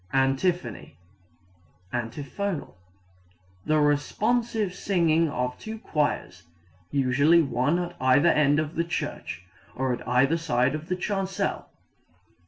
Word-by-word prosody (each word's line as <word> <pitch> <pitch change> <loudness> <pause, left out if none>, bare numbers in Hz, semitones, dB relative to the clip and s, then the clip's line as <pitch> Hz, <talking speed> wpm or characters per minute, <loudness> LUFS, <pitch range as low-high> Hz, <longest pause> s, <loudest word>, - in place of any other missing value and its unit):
Antiphony 135 - 0 1.0
(antiphonal) 140 - -4 0.9
the 155 0 +3
responsive 210 +8 +1
singing 165 -4 +2
of 125 -2 -2
two 220 0 -6
choirs, 145 - -2 0.5
usually 145 +5 +4
one 135 +4 +1
at 175 0 -4
either 130 +6 +5
end 150 -1 +3
of 155 0 -2
the 170 - 0
church, 160 - -5 0.3
or 130 -1 0
at 120 - -7
either 135 +6 +3
side 135 -5 +1
of 155 +1 -5
the 180 - +1
chancel. 195 0 -2
150 Hz, 110 wpm, -26 LUFS, 130-175 Hz, 1.0 s, either